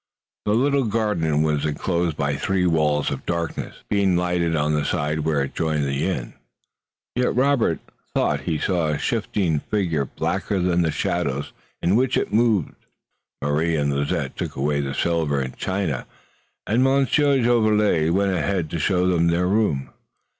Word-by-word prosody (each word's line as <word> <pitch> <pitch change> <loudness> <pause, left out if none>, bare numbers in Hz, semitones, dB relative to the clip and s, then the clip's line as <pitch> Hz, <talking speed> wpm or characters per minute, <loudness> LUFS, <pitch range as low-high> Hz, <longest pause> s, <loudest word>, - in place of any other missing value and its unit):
The 105 - +2
little 140 +2 +2
garden 100 -9 +1
was 75 -2 0
enclosed 85 +2 -1
by 70 0 0
three 95 +5 0
walls 75 -3 +1
of - - -4
darkness, 85 -1 -3
being 100 -3 +2
lighted 90 -2 0
on 75 0 +1
the 75 -1 +1
side 75 +2 -1
where 75 -2 +1
it 70 - -5
joined 80 -2 0
the 70 +4 -1
inn. 60 -10 -4 0.8
Yet 125 0 0
Robert 130 - +2 0.4
thought - - +1
he 80 - +1
saw 85 0 0
a 75 -1 0
shifting 100 - 0
figure 85 -7 -1
blacker 95 +8 -2
than 90 -1 +2
the 80 - +1
shadows 75 -4 -2 0.3
in 90 +4 +3
which 130 +2 +2
it - - -2
moved. 110 -7 +2 0.7
Marie 75 +3 +1
and 70 -2 0
Lizette 70 0 -2
took - - -4
away 70 +2 0
the 70 -1 -4
silver 80 -4 0
and 65 -1 -4
china 95 -9 -2 0.6
and 120 +5 +2
Monsieur 140 +1 +3
Jolivet 105 -8 +3
went 100 +2 +2
ahead 90 -1 -1
to 85 - -2
show 90 +3 +1
them 85 -2 +2
to 85 - +2
their 90 +1 +1
room. 80 - 0
85 Hz, 165 wpm, -23 LUFS, 75-100 Hz, 0.8 s, in